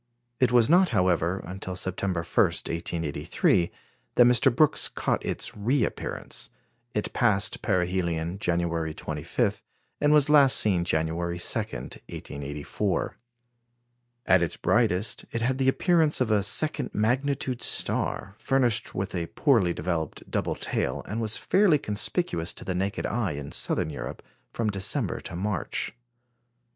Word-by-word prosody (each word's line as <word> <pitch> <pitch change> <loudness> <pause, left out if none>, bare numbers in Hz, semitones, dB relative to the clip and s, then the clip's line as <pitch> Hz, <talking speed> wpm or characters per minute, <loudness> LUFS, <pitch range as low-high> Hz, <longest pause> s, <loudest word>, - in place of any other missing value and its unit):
It 125 -2 +3
was 120 -2 +5
not, 180 +2 +5
however, 90 0 +1
until 95 0 -6
September 95 -1 -2
1, - - -10 0.2
1883, 85 0 -1 0.5
that 120 - +7
Mr. 125 +2 +5
Brooks 155 +2 +4
caught - - -1
its - - -2
reappearance; 115 +4 -2 0.5
it 105 - -2
passed 105 -5 +2
perihelion 90 -2 -1
January 85 -4 -1
25, - - -2 0.4
and 145 0 +3
was 150 -1 +5
last 145 -3 +6
seen 95 -5 +3
June 80 -2 +1
2, 80 +1 -4
1884. 85 - -3 1.1
At 95 -1 +5
its 85 - 0
brightest, 110 -3 +1
it 115 - -2
had 130 +2 0
the 130 0 +3
appearance 160 +1 +2
of 125 -4 +1
a 105 -1 +4
second 150 +10 +1
magnitude 130 +3 0
star, 95 - 0
furnished 125 -5 +1
with 95 0 -3
a 85 -2 -2
poorly 115 - +2
developed 80 -1 -3
double - - -1
tail, 65 - -2
and 110 +3 -3
was 110 -1 0
fairly 190 -6 +3
conspicuous 105 - -1
to - - -9
the 95 - -2
naked 95 +3 -2
eye 110 -7 -1
in 70 -1 -6
Southern 80 - 0
Europe, - - -7 0.3
from 110 -2 -1
December 95 -1 -1
to - - -7
March. 100 -1 -2
100 Hz, 135 wpm, -26 LUFS, 85-125 Hz, 1.1 s, that